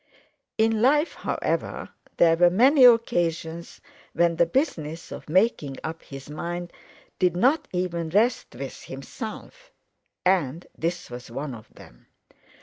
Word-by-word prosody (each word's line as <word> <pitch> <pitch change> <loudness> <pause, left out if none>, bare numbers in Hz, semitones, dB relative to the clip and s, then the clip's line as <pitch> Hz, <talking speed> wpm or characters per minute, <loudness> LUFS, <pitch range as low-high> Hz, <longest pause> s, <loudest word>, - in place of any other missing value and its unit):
In 220 0 +2
life, 295 +6 +3
however, - - -3 0.3
there 165 -1 +5
were 175 +1 +5
many 255 - +6
occasions 170 -8 +2 0.3
when 170 -1 +2
the 170 - +4
business 165 - -2
of - - -9
making 160 - +1
up 160 +1 -5
his 135 -1 -10
mind 175 +4 -5 0.5
did 180 -1 +2
not 265 - +3
even 175 -2 -2
rest 220 - +1
with 135 +1 -7
himself, 225 - -9 0.5
and 175 -4 +1
this 170 -4 -3
was 120 0 -8
one 135 +3 -5
of 110 -2 -12
them. - - -17
175 Hz, 130 wpm, -25 LUFS, 155-225 Hz, 0.5 s, many